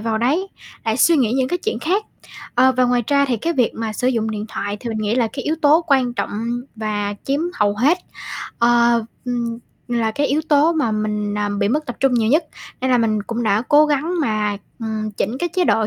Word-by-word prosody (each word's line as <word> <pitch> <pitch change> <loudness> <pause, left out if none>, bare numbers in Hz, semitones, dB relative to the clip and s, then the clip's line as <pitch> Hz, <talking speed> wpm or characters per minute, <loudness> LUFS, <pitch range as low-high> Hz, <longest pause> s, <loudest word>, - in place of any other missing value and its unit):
vào 220 0 -1
đấy, 300 - +1 0.4
lại 220 -1 0
suy 330 +5 +5
nghĩ 240 -6 +2
những 260 0 +1
cái 355 - -1
chuyện 440 +5 -2
khác. 385 +6 0 0.5
Ờ, 260 +2 +5
và 255 - +4
ngoài 245 0 +2
ra 280 -1 +3
thì 245 - +1
cái 330 +10 -1
việc 250 -7 +2
mà 225 -1 -3
sử 250 +4 0
dụng 225 -3 0
điện 210 -1 -4
thoại 205 -1 -4
thì 240 - -5
mình 220 -1 -3
nghĩ 215 +1 0
là 235 -3 +2
cái 270 - -5
yếu 310 - +1
tố 310 +3 +5
quan 260 -5 +2
trọng - - -2 0.5
và 210 -2 -2
chiếm 275 +2 0
hầu 205 -1 +1
hết, 290 - +3 0.6
ơ, 235 -1 +4 0.2
ừm, 235 -2 -2 0.3
là 235 -2 0
cái 285 +5 0
yếu 285 +3 +1
tố 300 +2 +4
mà 300 -9 0
mình, 210 -1 -2
à, 205 0 0
bị 200 -1 +1
mất 300 +6 0
tập 245 - -5
trung 270 -1 +3
nhiều 225 -2 +2
nhất. 315 +5 +3 0.4
Nên 260 0 0
là 250 - +4
mình 215 -2 +1
cũng 235 +3 -3
đã 215 -1 +2
cố 300 +1 +6
gắng 300 +4 0
mà, 215 -6 0 0.2
ừm, 220 -1 -3
chỉnh 225 +6 -2
cái 350 - -1
chế 360 +2 0
độ 225 -9 +2
240 Hz, 235 wpm, -20 LUFS, 220-285 Hz, 0.6 s, cố